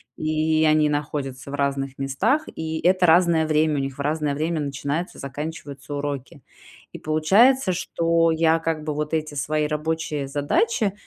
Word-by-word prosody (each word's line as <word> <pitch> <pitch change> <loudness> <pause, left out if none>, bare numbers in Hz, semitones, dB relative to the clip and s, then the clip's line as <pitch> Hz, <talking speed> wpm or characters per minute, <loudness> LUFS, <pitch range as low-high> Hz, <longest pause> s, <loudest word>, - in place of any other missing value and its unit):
И 155 0 +1
они 155 -1 +4
находятся 145 -2 -4
в 145 - -4
разных 140 -1 -2
местах, 135 - 0
и 160 0 -3
это 185 0 +3
разное 165 -1 +4
время, 155 0 +2
у - - +1
них 135 -1 -4
в 140 - -4
разное 150 -1 -1
время 160 +2 -1
начинаются, 145 +4 -3
заканчиваются 145 0 -7
уроки. 140 -1 -5 0.5
И - - -9
получается, 190 +10 +3
что 165 -1 +1
я 160 0 +3
как 160 -2 -2
бы 150 -1 -3
вот 150 +2 -2
эти 155 -1 -3
свои 150 +2 -1
рабочие 150 -2 -2
задачи 195 +9 0
155 Hz, 155 wpm, -23 LUFS, 145-160 Hz, 0.5 s, они